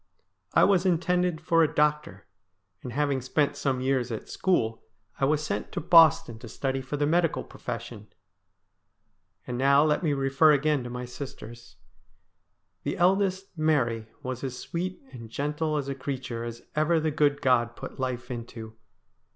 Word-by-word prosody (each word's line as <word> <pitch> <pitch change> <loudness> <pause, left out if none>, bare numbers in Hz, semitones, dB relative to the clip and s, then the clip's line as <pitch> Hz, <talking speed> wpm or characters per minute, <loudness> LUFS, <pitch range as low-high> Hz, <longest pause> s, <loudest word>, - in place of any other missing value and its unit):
I - - +6
was 190 -3 +4
intended 180 -1 +1
for 165 0 +3
a 160 - +3
doctor, 150 0 0 0.6
and, 125 - -7
having 140 0 0
spent 145 +3 0
some 135 -3 -1
years 130 -2 0
at 110 - -5
school, 115 -12 0 0.4
I 135 - +3
was 150 +2 +1
sent 105 -8 -3
to 190 - -2
Boston 160 -8 +5
to 120 - -10
study 135 +3 -2
for 130 +3 -5
the 145 - +1
medical 165 +2 +1
profession. 115 -3 -7 1.4
And 125 0 -4
now 140 +2 +5
let 155 -1 +2
me 155 -5 +1
refer 135 +3 +4
again 145 -1 +1
to - - -5
my 125 +1 -5
sisters. 120 -5 -9 1.1
The - - -3
eldest, 190 +1 +1
Mary, 125 -9 +1 0.2
was 130 0 -5
as 130 -2 -4
sweet 180 +4 -5
and 115 -3 -10
gentle 150 +4 -2
a 140 -1 -2
creature 130 -3 -5
as 120 0 -7
ever 155 +2 +2
the 155 0 0
good 145 -1 +2
God 120 -3 +2
put - - -9
life 125 -1 -3
into. 115 -2 -7
140 Hz, 160 wpm, -27 LUFS, 125-155 Hz, 1.4 s, I